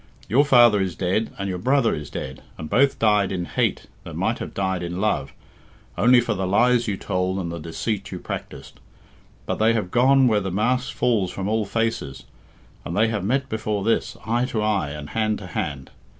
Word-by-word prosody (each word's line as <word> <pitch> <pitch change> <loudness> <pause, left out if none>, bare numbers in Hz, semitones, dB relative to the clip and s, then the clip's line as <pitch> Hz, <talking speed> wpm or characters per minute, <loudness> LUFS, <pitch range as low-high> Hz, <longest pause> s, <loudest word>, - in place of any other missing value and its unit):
Your 135 +5 +4
father 120 -7 +6
is 95 -3 -2
dead, 95 +6 0
and 100 - -3
your 90 -2 -3
brother 130 +1 +2
is 75 -1 -5
dead, 65 0 -6 0.2
and 80 -1 -7
both 140 +2 +3
died 105 -3 +2
in 90 -2 -2
hate - - -1 0.2
that - - -9
might - - -1
have - - -7
died 95 -2 -1
in 85 +1 -4
love, 105 +1 0 0.6
only 125 +3 +5
for 120 -2 0
the 95 -2 -2
lies 120 +4 +3
you 100 -2 -1
told 95 -1 -1
and 85 -3 -3
the 85 - -5
deceit 85 +7 -4
you - - -4
practised. - - -8 0.7
But - - -3
they 110 +1 +4
have 105 -6 -2
gone 130 +2 +5
where 105 -3 +2
the 95 - -3
mask 125 +8 0
falls 110 -7 +1
from 95 +2 -4
all 110 0 0
faces, 115 -11 -2 0.6
and 85 - -4
they 110 +2 +3
have 105 -4 -2
met 135 +6 0
before 110 -3 -2
this, 115 +2 0
eye 120 +2 +1
to 110 -4 -2
eye, 100 -8 0
and 75 0 -7
hand 110 -1 0
to 95 - -9
hand. 70 -6 -4
105 Hz, 205 wpm, -23 LUFS, 90-115 Hz, 0.7 s, father